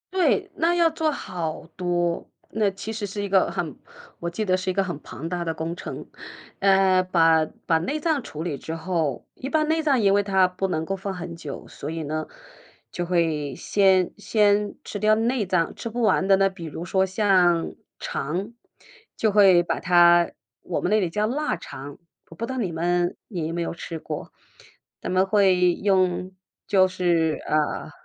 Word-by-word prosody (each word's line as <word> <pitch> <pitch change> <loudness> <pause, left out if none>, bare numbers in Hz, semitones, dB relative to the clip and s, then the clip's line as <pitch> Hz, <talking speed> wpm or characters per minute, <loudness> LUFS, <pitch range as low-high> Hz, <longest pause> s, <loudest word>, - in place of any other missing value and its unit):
对， 310 - +2
那 335 +2 +2
要 340 -1 +4
做 320 0 0
好 170 - -4
多， 175 -1 -1 0.2
那 215 -2 +1
其 195 +3 -7
实 215 -2 -4
是 205 +1 -4
一 200 - -3
个 190 -1 +3
很 160 -6 -4 0.4
我 170 - -3
记 195 +6 -3
得 185 -3 +2
是 185 0 -3
一 - - +1
个 195 +1 +1
很 175 -6 -5
庞 165 - -7
大 175 -1 -3
的 165 - -1
工 160 +2 -4
程。 - - -7 0.5
呃， 190 -1 +4
把 165 -3 +3 0.2
把 165 - +3
内 180 - -2
脏 310 -2 0
处 155 -8 -7
理 160 -5 -3
之 160 - -6
后 165 -5 -2
一 260 - -6
般 310 0 +2
内 320 0 +2
脏， 280 -6 +2
因 195 -2 +4
为 205 - +4
它 190 -2 +3
不 185 +1 -2
能 160 -4 -1
够 195 +4 -3
放 195 +1 -4
很 175 -2 -7
久， 150 -4 -7
所 145 - -7
以 165 0 -4
呢， 155 +1 -3 0.6
就 175 - -3
会 160 -5 0
先 190 -3 +3
先 210 -1 +2
吃 205 - -6
掉 215 +1 +4
内 230 0 0
脏， 175 -3 0
吃 - - -6
不 235 +2 -3
完 195 -3 +3
的 195 - +6
那 195 0 +3
比 190 -3 -9
如 160 +1 -6
说 190 +1 +1
像 185 -3 +2 0.2
肠， 180 +10 -4 0.6
就 220 - +1
会 195 -4 +6
把 - - -2
它 175 -1 +5 0.3
我 - - -2
们 180 - -1
那 215 - +4
里 185 -4 0
叫 210 +5 0
腊 290 +7 -1
肠， 140 +1 -9 0.3
我 165 - -12
不 230 - -3
知 250 - -6
道 260 - -4
你 190 -8 -2
们 175 +2 0
你 170 -6 -3
有 165 - -4
没 170 - -2
有 170 - -2
吃 170 0 -6
过， - - -7 0.7
咱 - - -4
们 185 +1 +3
会 190 -3 +4
用 185 -2 +1 0.3
就 190 -2 +5
是， 170 -4 +1
呃 155 -1 0
185 Hz, 210 characters per minute, -24 LUFS, 170-205 Hz, 0.7 s, 的